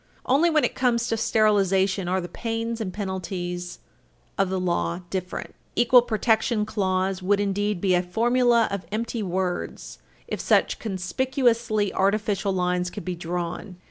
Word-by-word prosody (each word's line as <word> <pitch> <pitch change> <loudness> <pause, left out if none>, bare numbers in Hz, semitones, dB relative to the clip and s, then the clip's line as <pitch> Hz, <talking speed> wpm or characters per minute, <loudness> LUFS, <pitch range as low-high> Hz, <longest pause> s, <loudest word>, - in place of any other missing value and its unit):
Only 285 +7 +4
when 310 -2 +3
it - - +1
comes 240 -2 +1
to - - +1
sterilization 195 -4 +2
are 185 +1 +1
the 175 - -5
pains 230 +2 -3
and 190 -4 -3
penalties 180 -2 -4 0.6
of 195 -1 +1
the 190 0 -1
law 175 -1 -1
different. 185 -1 -4 0.2
The - - +3
equal 245 0 +7
protection 220 -1 +1
clause 190 -2 -1
would 200 +2 +2
indeed 205 0 0
be 185 0 +2
a 180 - +3
formula 235 +5 +2
of 200 -2 -3
empty 225 +1 -2
words 185 -2 -3 0.3
if - - -4
such - - +2
conspicuously 230 +1 0
artificial 200 0 +1
lines 180 -1 0
could 205 - -8
be 180 -1 -2
drawn. 175 +2 -5
200 Hz, 150 wpm, -25 LUFS, 185-225 Hz, 0.6 s, equal